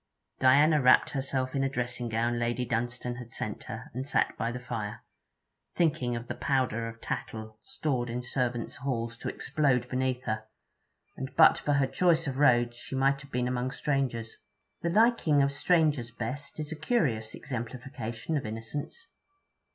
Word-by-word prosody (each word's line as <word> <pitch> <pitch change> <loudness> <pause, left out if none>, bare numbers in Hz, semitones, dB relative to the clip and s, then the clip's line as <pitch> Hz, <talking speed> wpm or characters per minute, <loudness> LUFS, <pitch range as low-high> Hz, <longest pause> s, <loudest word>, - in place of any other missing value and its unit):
Diana 145 +4 +5
wrapped 130 0 +5
herself 130 -2 -1
in 135 - +1
a 135 - +1
dressing 125 -2 -3
gown 120 +1 0
Lady 120 +1 0
Dunstane 120 +1 -2
had 120 -2 -9
sent - - -5
her, - - -7
and 130 +3 -4
sat - - +1
by 115 - -1
the 125 - -5
fire, 115 -4 -5 0.7
thinking 135 -8 +1
of 120 +1 -5
the - - -3
powder 125 -4 0
of 115 0 -8
tattle 110 -1 -5
stored 125 -3 -2
in 120 +1 -3
servants' 125 -2 -2
halls 120 -3 -2
to - - -3
explode 130 -5 +1
beneath 130 0 -1
her: 110 -2 -2 0.7
and 130 0 -5
but 160 - +7
for 145 - 0
her 140 -1 +3
choice 165 +3 +2
of 135 -3 -3
roads 120 -4 +4
she 135 - -6
might 135 +1 +2
have 145 - -13
been 125 0 0
among 125 0 -1
strangers. 130 -5 -2 0.4
The 170 - 0
liking 190 -8 +4
of 140 - +2
strangers 150 -4 +2
best 120 +7 -5
is 150 0 -4
a - - -3
curious 145 - 0
exemplification 125 +1 -5
of 140 - -2
innocence. 115 - -5
125 Hz, 165 wpm, -29 LUFS, 120-140 Hz, 0.7 s, but